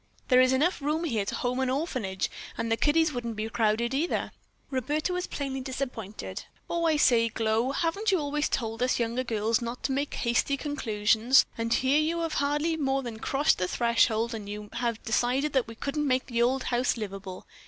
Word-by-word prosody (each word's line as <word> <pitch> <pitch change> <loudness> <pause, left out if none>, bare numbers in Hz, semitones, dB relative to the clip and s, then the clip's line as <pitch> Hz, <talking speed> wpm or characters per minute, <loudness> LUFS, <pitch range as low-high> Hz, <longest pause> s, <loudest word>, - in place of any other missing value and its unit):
"There 255 -1 +7
is 255 0 +4
enough 300 +6 +2
room 305 +4 0
here 225 -11 0
to - - -3
home 250 +1 -1
an 260 -1 +1
orphanage, 255 - -2 0.3
and 230 0 -2
the - - +4
kiddies 300 +6 +2
wouldn't 235 -2 -4
be 215 +1 -3
crowded, 225 +2 +1
either." 310 +6 -1 0.4
Roberta 295 +7 -1
was 360 0 -2
plainly 270 -2 -4
disappointed. 225 - -5 0.2
"Oh, 340 0 -1
I 315 - +3
say, 230 -5 +4
Glow, 225 +3 0
haven't 340 +9 0
you 380 - +3
always 295 -1 -1
told 225 -1 -2
us 250 0 +2
younger 235 +2 0
girls 225 -1 0
not 235 +1 -5
to 275 - 0
make 280 +2 -1
hasty 240 +3 +1
conclusions, 230 -3 +3
and 230 0 -3
here 260 +5 +3
you 335 +2 0
have 330 -2 -2
hardly 295 +3 0
more 270 -2 0
than 230 -3 -6
crossed 280 +6 +2
the 180 - 0
threshold 235 +1 +2
and 210 -3 -6
you 210 0 -6
have 235 -2 -2
decided 250 +6 +1
that 260 -4 +2
we 230 - -9
couldn't 290 +5 -2
make 255 -1 +1
the 235 -2 -1
old 255 +2 +2
house 245 0 +1
livable. 195 -3 -6
250 Hz, 195 wpm, -28 LUFS, 225-285 Hz, 0.4 s, There